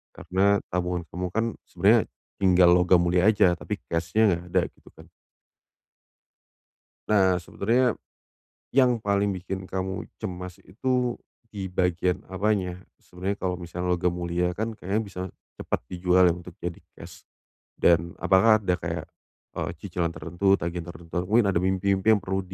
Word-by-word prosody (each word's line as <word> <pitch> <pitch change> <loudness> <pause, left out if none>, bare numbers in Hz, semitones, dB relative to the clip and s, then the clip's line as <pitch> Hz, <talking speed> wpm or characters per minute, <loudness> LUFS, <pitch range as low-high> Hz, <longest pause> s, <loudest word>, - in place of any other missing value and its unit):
karena 100 +2 +2 0.2
tabungan 90 -1 -1
kamu 90 +1 -2
kan 110 +2 +1 0.2
sebenarnya - - +3 0.3
tinggal 90 -2 +6
logam 90 0 +5
mulia 90 +3 +3
aja, 105 -5 +4
tapi - - -4
cash-nya 85 +6 +1
enggak 85 0 -2
ada - - +3
gitu - - -20
kan. - - -13 2.0
Nah 95 -3 +4
sebenernya. 120 +8 +1 0.7
Yang 125 -3 +3
paling 100 0 +1
bikin 95 +1 -5
kamu 95 +1 -4 0.2
cemas 90 -4 -6
itu 125 +4 -1 0.3
di 95 -3 -6
bagian 90 0 0
apanya? 95 -2 0 0.2
Sebenernya 95 +3 -5
kalau 90 -1 -1
misalnya 90 +1 -5
logam 90 0 +1
mulia 90 0 -1
kan 110 +3 -4
kayaknya 100 +4 -1
bisa, 100 -4 -7 0.4
cepet - - -2
dijual 90 0 +3
ya 85 - +1
untuk 90 0 -10
jadi 85 -1 -4 0.2
cash, - - -13 0.5
dan 85 0 +2
apakah 105 +4 +5
ada 90 -4 -1
kayak, - - -3 0.5
eee, - - -3
cicilan 85 -2 -2
tertentu 85 +5 +1
tagihan 85 0 -5
tertentu 85 -1 -12 0.2
mungkin 115 +1 +4
ada 85 - +1
mimpi-mimpi 95 +2 +1
yang 110 -3 +5
perlu 95 +1 -1
90 Hz, 145 wpm, -26 LUFS, 90-100 Hz, 2.0 s, tinggal